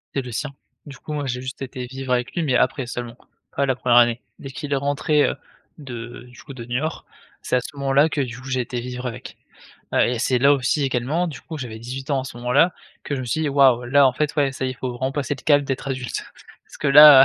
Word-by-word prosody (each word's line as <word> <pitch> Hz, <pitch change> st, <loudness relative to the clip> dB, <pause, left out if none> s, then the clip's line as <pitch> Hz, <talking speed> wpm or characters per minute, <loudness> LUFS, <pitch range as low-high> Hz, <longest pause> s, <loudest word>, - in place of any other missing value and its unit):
C'est 135 Hz, -, +1 dB
le 125 Hz, -, -7 dB
sien. 140 Hz, +6 st, -3 dB, 0.3 s
Du 140 Hz, -, -10 dB
coup, 155 Hz, -, -9 dB
moi, 145 Hz, -1 st, -2 dB
j'ai 125 Hz, -1 st, -3 dB
juste 130 Hz, +1 st, -7 dB
été 125 Hz, -1 st, -5 dB
vivre 130 Hz, 0 st, -3 dB
avec 125 Hz, 0 st, -1 dB
lui, 175 Hz, -, 0 dB
mais 130 Hz, -4 st, +1 dB
après 130 Hz, +2 st, +2 dB
seulement, 120 Hz, -1 st, -6 dB, 0.4 s
pas 140 Hz, -, +2 dB
la 130 Hz, -1 st, +1 dB
1re 120 Hz, -1 st, +3 dB
année. 120 Hz, 0 st, +5 dB, 0.2 s
Dès 135 Hz, -, -8 dB
qu'il 145 Hz, +1 st, -7 dB
est -, -, +3 dB
rentré, 145 Hz, +2 st, +2 dB
heu, -, -, -1 dB, 0.4 s
de 120 Hz, -5 st, -8 dB
du -, -, -14 dB
coup 140 Hz, -, -10 dB
de 125 Hz, -3 st, -8 dB
Niort, 125 Hz, +7 st, -3 dB, 0.4 s
c'est -, -, +1 dB
à 125 Hz, -, 0 dB
ce 145 Hz, -, -9 dB
moment-là 140 Hz, +2 st, +3 dB
que, 160 Hz, -2 st, -1 dB
du 125 Hz, -2 st, -4 dB
coup, 130 Hz, -, -11 dB
j'ai 130 Hz, -1 st, +1 dB
été 120 Hz, +1 st, -4 dB
vivre 125 Hz, +1 st, -5 dB
avec. 120 Hz, 0 st, -8 dB, 0.6 s
Heu, -, -, +4 dB
et 120 Hz, -1 st, -1 dB
c'est 125 Hz, +1 st, +2 dB
là 140 Hz, +3 st, +5 dB
aussi 140 Hz, +2 st, +1 dB
également, 135 Hz, +7 st, 0 dB
du 145 Hz, -5 st, -8 dB
coup, 160 Hz, -, -7 dB
j'avais 120 Hz, -5 st, -6 dB
18 130 Hz, +5 st, -7 dB
ans 135 Hz, -2 st, +1 dB
à -, -, -9 dB
ce 125 Hz, -, -8 dB
moment-là 125 Hz, +8 st, +3 dB, 0.3 s
que 145 Hz, -, -2 dB
je 135 Hz, -, -3 dB
me 130 Hz, -, -4 dB
suis 155 Hz, +7 st, -1 dB
dit: 155 Hz, -, +1 dB
«Waouh, 135 Hz, -3 st, +4 dB
là 140 Hz, +3 st, +5 dB
en 130 Hz, -, +3 dB
fait 150 Hz, +3 st, -1 dB
ouais 140 Hz, -2 st, +3 dB
ça 135 Hz, -, -4 dB
y -, -, -1 dB
est, -, -, -3 dB
faut 125 Hz, +2 st, -4 dB
vraiment 130 Hz, +2 st, -2 dB
passer 145 Hz, 0 st, -2 dB
le -, -, -12 dB
cap 145 Hz, -2 st, +5 dB
d'être 135 Hz, 0 st, -4 dB
adulte» 130 Hz, -2 st, -3 dB, 0.4 s
parce -, -, -14 dB
que 150 Hz, -, 0 dB
là, 140 Hz, -1 st, +10 dB
130 Hz, 270 wpm, -22 LUFS, 125-145 Hz, 0.6 s, là